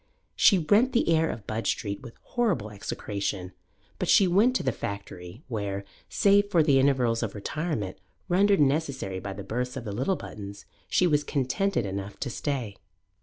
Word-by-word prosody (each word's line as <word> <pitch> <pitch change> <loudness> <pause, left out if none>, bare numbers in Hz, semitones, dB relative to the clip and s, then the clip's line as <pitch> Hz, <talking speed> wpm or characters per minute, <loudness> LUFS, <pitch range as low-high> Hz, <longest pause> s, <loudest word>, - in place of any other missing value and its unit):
She 195 - +6
rent 205 +10 +3
the 235 - +2
air 160 0 +3
of 110 - -6
Budge 110 +1 -3
Street 100 +1 -2
with 120 -3 -11 0.2
horrible 190 - 0
execration; 100 -2 -4 0.5
but - - -2
she 195 - +6
went 210 +8 +4
to - - +1
the 130 - +1
factory, 100 - -7
where, 100 -4 -3 0.2
save 205 0 +4
for 170 -5 +4
the 140 -3 +4
intervals 125 -4 +2
of 110 -3 -3
retirement 105 - -3 0.3
rendered 195 +2 +4
necessary 135 -9 0
by 100 +1 -5
the 100 0 -7
births 125 +5 -3
of 125 - -6
the 105 - -4
little 130 - 0
Buttons, 100 - -9 0.2
she 180 - +3
was 150 -4 +2
contented 145 - 0
enough 100 +1 -5
to 130 - -2
stay. 120 -8 -3
125 Hz, 170 wpm, -27 LUFS, 100-165 Hz, 0.5 s, She